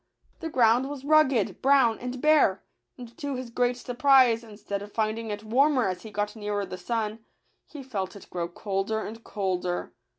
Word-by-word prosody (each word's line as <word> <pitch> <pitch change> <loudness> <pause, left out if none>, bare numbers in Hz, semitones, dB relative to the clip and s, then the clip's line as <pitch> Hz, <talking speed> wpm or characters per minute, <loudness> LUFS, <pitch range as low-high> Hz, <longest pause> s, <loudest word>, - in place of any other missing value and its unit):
The 325 - -4
ground 245 0 +3
was 280 -2 -7
rugged, 280 -8 +3
brown, 265 -4 +4
and 250 +1 -5
bare; 300 -10 +4 0.3
and 240 -1 -11
to 285 -2 -3
his 250 -2 -6
great 245 +1 +1
surprise, 250 -2 +4
instead 205 -2 -6
of 205 +1 -9
finding 220 +1 -2
it 210 0 -5
warmer 255 +2 +3
as 185 -1 -3
he 220 - -9
got 210 +1 -3
nearer 205 -2 -2
the 185 - -7
sun, 215 +3 -3 0.5
he 290 -3 -9
felt 205 -8 -4
it 200 - -12
grow 175 -1 -2
colder 195 +4 -2
and 225 +2 -8
colder. 180 -3 -3
225 Hz, 175 wpm, -27 LUFS, 205-260 Hz, 0.5 s, brown